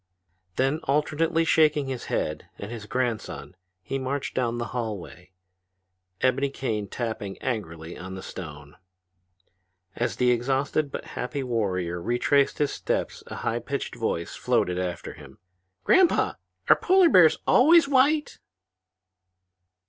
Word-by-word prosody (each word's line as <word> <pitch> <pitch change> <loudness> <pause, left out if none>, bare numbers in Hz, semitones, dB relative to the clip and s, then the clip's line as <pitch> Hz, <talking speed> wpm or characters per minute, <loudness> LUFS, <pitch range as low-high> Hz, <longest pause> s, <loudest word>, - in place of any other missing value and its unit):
Then 135 +4 +1
alternately 160 +3 +1
shaking 150 -3 +3
his 130 -2 -5
head 75 - -3
and 100 +3 -7
his 110 -3 -7
grandson 120 -6 -3 0.3
he 135 - -3
marched 135 +1 -3
down 120 -2 -1
the 120 0 -4
hallway, 100 -6 -5 0.9
ebony 130 +2 +2
cane 110 -7 -3
tapping 110 -4 -4
angrily 85 -10 -4
upon 95 +2 -8
the 95 - -8
stone. 75 -4 -9 1.2
As 120 - -1
the 125 -1 +3
exhausted 135 +4 0
but - - -6
happy 135 +3 -3
warrior 95 -8 -1
retraced 120 +6 +2
his 145 -1 +1
steps - - -2
a - - -7
high - - 0
pitched - - -4
voice - - -3
floated 90 0 0
after 90 -1 -4
him. - - -14 0.5
"Grandpa, 370 -2 +4 0.3
are - - +8
polar 375 -1 +4
bears 175 - +6
always 320 +5 +6
white?" 285 +2 +2
125 Hz, 125 wpm, -26 LUFS, 100-145 Hz, 1.2 s, are